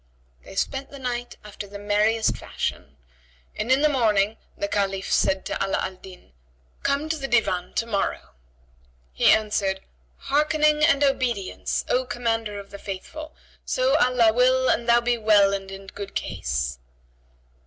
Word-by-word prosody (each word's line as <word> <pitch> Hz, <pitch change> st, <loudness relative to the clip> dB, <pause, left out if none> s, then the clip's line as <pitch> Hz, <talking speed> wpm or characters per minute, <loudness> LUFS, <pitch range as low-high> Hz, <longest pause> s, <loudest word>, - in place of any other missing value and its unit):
They -, -, -12 dB
spent 270 Hz, +6 st, -2 dB
the 280 Hz, -, -10 dB
night 245 Hz, -2 st, -4 dB
after 205 Hz, -1 st, -8 dB
the 200 Hz, +1 st, -9 dB
merriest 210 Hz, +2 st, +1 dB
fashion, -, -, -5 dB, 0.6 s
and 235 Hz, -, -2 dB
in 270 Hz, +3 st, +4 dB
the -, -, +6 dB
morning 220 Hz, -6 st, +2 dB, 0.2 s
the 200 Hz, -, -1 dB
Caliph 195 Hz, -1 st, -1 dB
said 190 Hz, 0 st, +2 dB
to -, -, -2 dB
Ala 195 Hz, -, 0 dB
al 185 Hz, -1 st, -3 dB
Din, 185 Hz, -, -14 dB, 0.5 s
"Come 280 Hz, +2 st, 0 dB
to 320 Hz, -, 0 dB
the 270 Hz, -2 st, -4 dB
Divan 185 Hz, -7 st, 0 dB
to 230 Hz, -, +1 dB
morrow." 205 Hz, -4 st, -2 dB, 0.8 s
He -, -, +4 dB
answered, 205 Hz, -3 st, +1 dB, 0.4 s
"Hearkening 300 Hz, +1 st, +2 dB
and 290 Hz, -2 st, +4 dB
obedience, 245 Hz, -8 st, -1 dB
O 255 Hz, -, +2 dB
Commander 225 Hz, -4 st, -2 dB
of 200 Hz, -1 st, -12 dB
the 200 Hz, -, -9 dB
Faithful; 305 Hz, +12 st, -7 dB, 0.3 s
so -, -, +1 dB
Allah 245 Hz, -3 st, +4 dB
will 255 Hz, +2 st, +3 dB
and 235 Hz, 0 st, -1 dB
thou 235 Hz, 0 st, +6 dB
be 240 Hz, 0 st, 0 dB
well 205 Hz, -2 st, +5 dB
and 195 Hz, -1 st, -4 dB
in 195 Hz, 0 st, -9 dB
good 200 Hz, +1 st, -8 dB
case!" 60 Hz, 0 st, -2 dB
220 Hz, 155 wpm, -24 LUFS, 195-260 Hz, 0.8 s, the